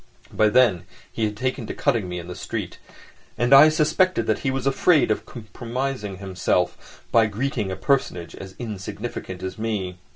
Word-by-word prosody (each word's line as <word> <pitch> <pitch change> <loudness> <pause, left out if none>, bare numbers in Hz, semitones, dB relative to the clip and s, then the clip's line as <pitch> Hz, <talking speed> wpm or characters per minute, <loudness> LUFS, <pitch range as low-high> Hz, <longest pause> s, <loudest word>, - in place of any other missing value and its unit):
By 110 - +4
then 115 -7 +3 0.3
he 110 - -1
had 105 -1 -3
taken 130 -2 -2
to - - -5
cutting 105 -6 0
me 90 - -4
in 85 0 -7
the 90 - -6
street, - - -5 0.6
and 120 +3 +3
I 145 +3 +10
suspected 155 -2 +2
that 110 - 0
he 135 - -1
was 130 -1 -2
afraid 135 -1 +3
of 105 - -2
compromising 120 -1 -5
himself 90 -2 -2
by 115 -2 +5
greeting 110 -1 -2
a 95 - -3
personage 95 -5 -1
as 95 -1 -10
insignificant 105 -3 -6
as 95 +3 -5
me. 100 -5 -3
110 Hz, 170 wpm, -23 LUFS, 95-130 Hz, 0.6 s, I